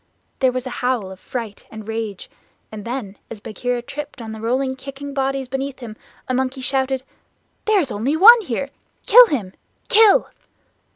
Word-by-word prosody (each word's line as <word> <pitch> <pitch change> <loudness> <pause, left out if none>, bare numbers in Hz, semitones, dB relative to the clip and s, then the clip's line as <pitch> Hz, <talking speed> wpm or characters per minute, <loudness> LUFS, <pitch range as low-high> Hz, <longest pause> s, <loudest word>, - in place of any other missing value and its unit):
There 260 -2 +3
was 255 0 -4
a 255 - -5
howl 245 -6 -1
of 190 - -11
fright 225 -3 -6
and 220 -1 -10
rage, 220 -4 -4 0.4
and 215 -2 -8
then 230 -5 -5
as 225 - -8
Bagheera 240 +3 -3
tripped 290 +2 -7
on 225 -2 -7
the 220 0 -8
rolling 260 +3 0
kicking 275 +1 -8
bodies 270 -1 -1
beneath 270 +1 -4
him, 235 -4 -9 0.3
a 255 - -1
monkey 260 +1 -1
shouted: 265 0 0 0.6
"There 430 -2 +4
is 280 -8 -1
only 255 +9 -1
one 460 +6 +9
here! 275 - -3 0.4
Kill - - +9
him! 210 - -3 0.4
Kill." 430 -1 +6
255 Hz, 170 wpm, -21 LUFS, 225-275 Hz, 0.6 s, one